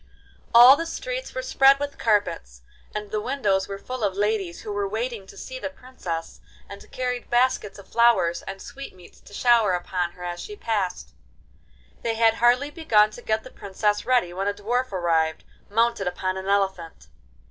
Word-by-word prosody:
All 245 +3 +9
the 330 +3 -4
streets - - -5
were - - -3
spread 275 - +5
with 285 0 -5
carpets, 65 - 0 0.3
and 210 -1 -5
the 215 - -1
windows 210 -7 0
were 195 - -5
full 255 +3 -6
of 195 -2 0
ladies 205 -4 -1
who 210 - -5
were 205 -1 -1
waiting 220 -2 -4
to 195 - -14
see 260 +4 -7
the - - -4
Princess, 220 -12 -7 0.3
and 200 0 -12
carried 250 -1 -3
baskets 240 -5 +1
of 200 -1 -13
flowers 195 -8 +3
and 195 0 -7
sweetmeats 185 -10 -11
to - - -17
shower 230 -3 +3
upon 175 -1 -2
her 180 - -11
as 175 0 -4
she 420 - -7
passed. 205 - -3 0.9
They 230 -1 -1
had 225 0 +4
hardly 245 +5 +2
begun 215 -11 +3
to 240 - -11
get 220 -1 -1
the 255 - -12
Princess 205 +1 -1
ready 240 -9 +1
when 195 +2 -2
a 205 - 0
dwarf 240 +5 -1
arrived, 165 -4 0 0.3
mounted 230 -2 +1
upon 185 +1 -2
an 190 0 -6
elephant. 190 -4 -1
210 Hz, 180 wpm, -24 LUFS, 190-245 Hz, 0.9 s, All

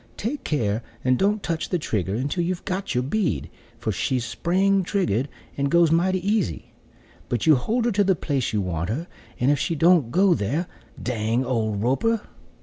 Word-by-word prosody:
Take 255 +8 -3
care 115 -7 0 0.2
and 130 0 +3
don't 205 +6 +1
touch 165 -2 -2
the 180 - +1
trigger 100 - -2
until 145 +9 -1
you've 175 +1 -3
got 190 -4 -3
your 125 - +2
bead; 175 +5 -1 0.3
for - - -2
she's 125 -3 -1
spring 190 - +1
trigger'd 160 - 0 0.3
and 140 0 0
goes 170 0 +4
mighty 185 +3 +1
easy: 205 - -1 0.6
but 120 - -1
you 160 - +7
hold 225 - 0
her 240 - +2
to 205 0 +3
the 190 -1 +3
place 140 -7 -1
you 105 -2 0
want 85 -2 -2
her, 145 +10 -2 0.3
and 130 +4 +3
if 145 - +1
she 165 +3 -1
don't 165 -5 +4
go 185 +7 +4
there, 145 - -1 0.3
dang 115 +1 -1
old 110 -4 -1
Roper." 215 - +1
155 Hz, 185 wpm, -24 LUFS, 120-185 Hz, 0.6 s, you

